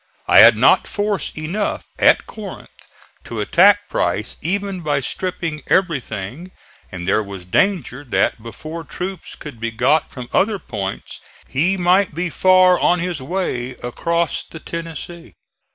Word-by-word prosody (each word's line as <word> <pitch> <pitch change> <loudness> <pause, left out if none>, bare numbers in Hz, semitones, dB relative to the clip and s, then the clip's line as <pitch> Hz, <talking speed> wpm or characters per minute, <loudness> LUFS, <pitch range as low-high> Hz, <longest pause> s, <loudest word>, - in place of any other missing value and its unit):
I - - +7
had - - +9
not - - +4
force 205 -5 -2
enough 175 +7 -3
at - - +5
Corinth 210 -3 -11 0.4
to 115 - -6
attack 200 - +4
Price 90 +6 -1
even 195 +2 -2
by 145 -3 0
stripping 165 +1 -3
everything; 140 - -1 0.4
and 90 -1 -6
there 105 +2 +3
was 100 -3 -8
danger 145 - 0
that 120 -2 0
before 155 +9 -8
troops 180 +5 -6
could 145 -7 -10
be 115 0 -2
got 130 +7 +1
from 125 -2 -8
other 210 +1 +2
points 100 - -6 0.3
he 175 +8 +1
might 180 -1 +2
be 170 0 -2
far 185 0 +5
on 180 - +3
his 175 -4 -3
way 130 -6 -3
across 170 +7 -1
the 160 - -11
Tennessee. 165 - -8
165 Hz, 140 wpm, -20 LUFS, 120-185 Hz, 0.4 s, had